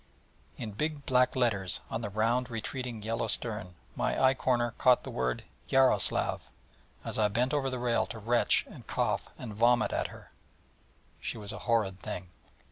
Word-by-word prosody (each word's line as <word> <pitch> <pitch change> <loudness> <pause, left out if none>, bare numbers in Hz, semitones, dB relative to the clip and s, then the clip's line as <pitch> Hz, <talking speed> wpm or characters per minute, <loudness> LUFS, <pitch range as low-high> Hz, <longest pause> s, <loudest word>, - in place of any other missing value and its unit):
In 110 - -5
big 150 +6 -3
black 125 0 +3
letters 105 -7 +1
on 115 - -2
the 105 - -3
round 115 +5 +1
retreating 120 0 -5
yellow 115 +2 -1
stern 105 -6 0 0.2
my - - 0
eye 130 0 +5
corner 120 -2 +1
caught 125 -2 +5
the - - -7
word 60 0 -1 0.3
Yaroslav, 135 -1 +3 0.6
as - - -3
I 105 - +4
bent 120 +6 0
over 140 -2 +1
the 130 - -3
rail 120 -1 +1
to 115 - -7
retch 115 +3 +2
and - - -13
cough - - -1
and 115 -4 -7
vomit 120 +3 +3
at - - 0
her. - - -14 0.9
She - - -4
was 105 -1 -5
a - - -7
horrid 105 -5 +2
thing. 90 0 -6
115 Hz, 170 wpm, -30 LUFS, 105-125 Hz, 0.9 s, eye